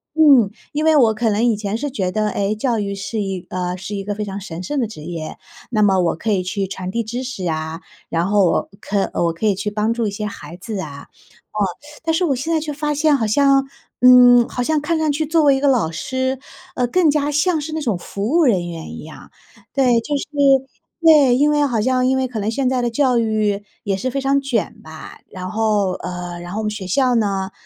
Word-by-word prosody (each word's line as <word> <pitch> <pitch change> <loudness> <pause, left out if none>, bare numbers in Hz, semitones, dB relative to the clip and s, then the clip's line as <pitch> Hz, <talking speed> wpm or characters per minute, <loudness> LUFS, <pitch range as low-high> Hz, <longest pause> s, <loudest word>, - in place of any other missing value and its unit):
嗯， 275 -10 +6 0.2
因 305 +2 -1
为 315 - +5
我 235 -6 +5
可 225 +1 0
能 210 +2 0
以 230 -4 +2
前 210 0 -3
是 285 +3 -4
觉 190 -8 -2
得： 215 -1 0
“哎， 200 +1 -1
教 230 +1 -1
育 200 -1 -3
是 200 +3 -4
一 195 -3 -3
呃， 180 -1 -3
是 190 +3 -7
一 200 - -3
个 205 0 -3
非 210 - -3
常 200 -1 -5
神 180 -3 -7
圣 290 +5 -2
的 240 - 0
职 205 -8 -11
业。 165 -2 -6 0.3
那 215 -3 0
么 195 -2 +4
我 175 -2 +1
可 215 +6 -2
以 190 - +1
去 195 +2 -2
传 185 -1 -6
递 230 +3 -1
知 240 +4 -4
识， 245 -8 -5
啊， 160 +1 -4 0.3
然 165 +1 0
后 205 -1 +3
我 170 - 0
可 200 -1 -1
我 165 - 0
可 165 +7 -4
以 210 - +4
去 200 +2 -3
帮 210 +2 0
助 230 -2 -1
一 - - -2
些 210 +1 -4
孩 200 -4 -8
子 210 +2 -5
啊， 140 -5 -8 0.4
哦。” 215 - -5 0.5
但 325 - +1
是 360 - +1
我 280 -5 +1
现 320 +6 -2
在 320 - +1
却 300 -1 -4
发 295 +1 -2
现 300 0 +3
好 225 -4 -1
像 275 +3 +3 0.3
嗯， 245 -1 +7
好 245 - -2
像 310 +3 +1
看 325 +2 0
上 315 -1 +1
去 305 +2 -1
作 315 +1 +2
为 280 -2 +5
一 - - -2
个 285 - +1
老 235 -12 +2
师， 260 +9 -2 0.4
呃， 250 -1 +1
更 330 +3 +3
加 290 -1 0
像 315 +3 +1
是 305 +1 -5
那 315 - -2
种 225 -10 -1
服 200 +4 -4
务 330 +3 +3
人 180 -8 +1
员 165 - -7
一 80 - -8
样。 - - -12 0.4
对， 270 -1 +2
就 290 +5 -3
是 - - -4 0.8
对， 300 -6 +6
因 295 +2 +3
为 295 -1 +2
好 240 -5 0
像 255 +2 +1
因 265 +1 +2
为 260 -1 0
可 240 -3 -5
能 210 +2 -1
现 255 +2 0
在 255 -1 0
的 240 - 0
教 255 0 +2
育， 215 -2 0 0.2
也 200 -1 -1
是 255 - -2
非 275 - -2
常 275 +1 +2
卷 250 -6 -2
吧。 160 0 -11
然 185 -1 -7
后 215 -3 +1
呃， 180 -1 -6
然 175 - -8
后 215 - -2
我 - - -5
们 210 - -1
学 205 -3 -6
校 250 +6 +2
呢， 195 -3 0
225 Hz, 265 characters per minute, -19 LUFS, 195-275 Hz, 0.8 s, 嗯